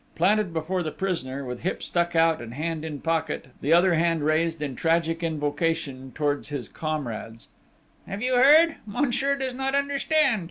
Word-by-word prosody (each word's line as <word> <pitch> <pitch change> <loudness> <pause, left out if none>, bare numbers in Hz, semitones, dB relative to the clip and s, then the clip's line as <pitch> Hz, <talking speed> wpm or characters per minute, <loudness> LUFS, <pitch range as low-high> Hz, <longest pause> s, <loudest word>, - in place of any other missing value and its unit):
Planted 195 +2 +2
before 165 +3 -2
the 160 - -2
prisoner, 140 -7 -3
with 125 -1 -5
hip 185 - -3
stuck 170 -1 0
out 165 -2 +3
and 120 0 -8
hand 160 +1 -3
in 150 -3 -6
pocket, 165 -4 -2
the 145 - -1
other 175 +2 +5
hand 165 -1 +1
raised 160 +1 +1
in 145 -3 -4
tragic 165 +2 +1
invocation 150 -3 -2
towards 145 -2 -1
his 140 -7 -4
comrades: 120 -7 -5 0.6
"You 235 +6 -2
have 250 0 +5
heard?... 315 +4 +7
Monsieur 275 +4 0
does 265 -2 -3
not 270 +2 -1
understand!... 280 -2 +2
165 Hz, 165 wpm, -25 LUFS, 150-205 Hz, 0.6 s, heard